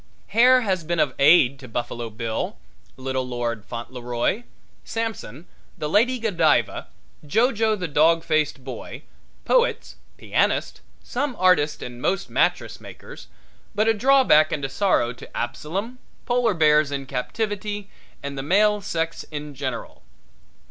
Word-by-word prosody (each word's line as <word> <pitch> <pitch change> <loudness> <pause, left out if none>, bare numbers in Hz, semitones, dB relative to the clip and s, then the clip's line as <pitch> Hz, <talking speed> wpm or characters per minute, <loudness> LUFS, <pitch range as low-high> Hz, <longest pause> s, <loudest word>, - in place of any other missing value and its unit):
Hair 250 +4 +5
has 190 -6 -1
been 170 +1 -2
of 140 -4 +2
aid 140 -3 +5
to 130 - -11
Buffalo 120 0 -4
Bill, 110 - -4 0.4
Little 130 0 -2
Lord 120 -3 -3
Fauntleroy, 120 - -3 0.4
Samson, 220 - -5 0.3
The 150 - -3
Lady 235 +10 +3
Godiva, 180 -10 +1 0.4
Jo 225 - +2
Jo, 220 -1 +1
the 180 -4 -4
Dog 165 +2 +3
Faced 155 -4 0
Boy, 130 -1 -8 0.4
poets, - - +1 0.2
pianists, - - 0 0.2
some 265 0 -3
artists 165 -5 +2
and 125 0 -8
most 195 +6 -1
mattress - - 0
makers, - - -12 0.5
but 215 +2 +2
a 225 - +5
drawback 240 - +4
and 145 -2 -2
a - - -3
sorrow 135 -6 +1
to 125 - -11
Absalom, 185 - -4 0.3
polar 240 -4 +1
bears 150 -2 +4
in 140 -1 -3
captivity 205 - -3 0.4
and 140 0 -5
the 135 - -3
male 205 +7 +3
sex 165 -4 -3
in 150 -1 -6
general. 130 -4 -5
155 Hz, 135 wpm, -23 LUFS, 130-210 Hz, 0.5 s, Hair